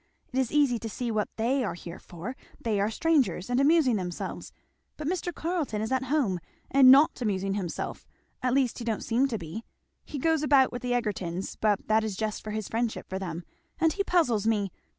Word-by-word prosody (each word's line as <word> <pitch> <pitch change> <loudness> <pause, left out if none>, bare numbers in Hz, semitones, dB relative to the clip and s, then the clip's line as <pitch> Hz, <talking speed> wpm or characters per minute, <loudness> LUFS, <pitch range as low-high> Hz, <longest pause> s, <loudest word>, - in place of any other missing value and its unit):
It 260 - +1
is 260 -3 0
easy 280 -6 +3
to 225 - -5
see 240 +2 -3
what 215 -2 0
they 250 +4 +1
are - - -2
here 170 0 -9
for, 185 +9 -7 0.2
they 215 -3 0
are 205 +2 +2
strangers 245 - +1
and 245 - +2
amusing 280 -5 +4
themselves; 180 -2 -5 0.5
but 300 - -4
Mr. 355 0 -1
Carleton 320 -9 -2
is 220 +3 -3
at 260 0 +1
home, 255 - +1 0.3
and 265 -1 +7
not 275 0 +6
amusing 195 -3 0
himself, 190 -4 -4 0.3
at 250 0 +1
least 260 -3 +1
he - - -5
don't 225 -2 -2
seem 245 +4 +2
to 235 -4 -2
be. 175 +5 -7 0.4
He 295 - -7
goes 320 +2 +2
about 280 -3 +4
with 245 - -5
the 250 -1 -1
Egertons, 195 -6 -2
but 210 -2 0
that 220 0 +3
is 215 -3 -3
just 215 -1 -3
for 215 - -6
his 215 -1 -3
friendship 230 0 -2
for 190 - -4
them; 175 -3 -5 0.4
and 325 -1 +3
he 400 - 0
puzzles 245 - +2
me. 205 -4 +1
230 Hz, 210 wpm, -28 LUFS, 205-275 Hz, 0.5 s, and